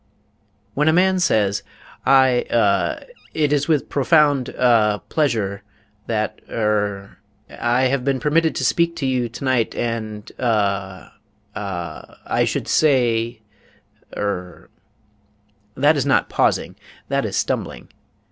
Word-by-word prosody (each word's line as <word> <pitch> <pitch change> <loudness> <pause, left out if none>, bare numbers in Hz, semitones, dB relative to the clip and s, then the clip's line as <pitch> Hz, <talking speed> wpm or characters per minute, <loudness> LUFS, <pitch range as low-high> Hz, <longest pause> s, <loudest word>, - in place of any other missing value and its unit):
When 150 +2 +1
a 160 - +5
man 185 +2 +3
says: 105 - +1 0.5
"I 130 -2 +5
uh 105 -4 +1 0.3
it 150 -2 +1
is 145 -1 +1
with 155 -4 +1
profound 145 -2 +2
ah 110 -4 +3
pleasure 110 - 0 0.5
that 110 -2 -2
er 105 -3 -2 0.3
I 120 +2 0
have 130 0 +1
been 135 -1 0
permitted 160 +4 +1
to - - -1
speak 170 0 +1
to 160 -5 -3
you 125 -2 0
tonight 120 -1 -1
and 110 -3 -4
uh 100 -5 -1 0.4
uh 90 -6 -6
I - - +1
should - - -2
say 120 -6 +2 0.8
er" 90 -3 -4 1.1
that 145 +4 +4
is 140 - 0
not 140 - +2
pausing; - - 0 0.3
that - - 0
is - - -3
stumbling. - - -3
120 Hz, 120 wpm, -21 LUFS, 105-140 Hz, 1.1 s, a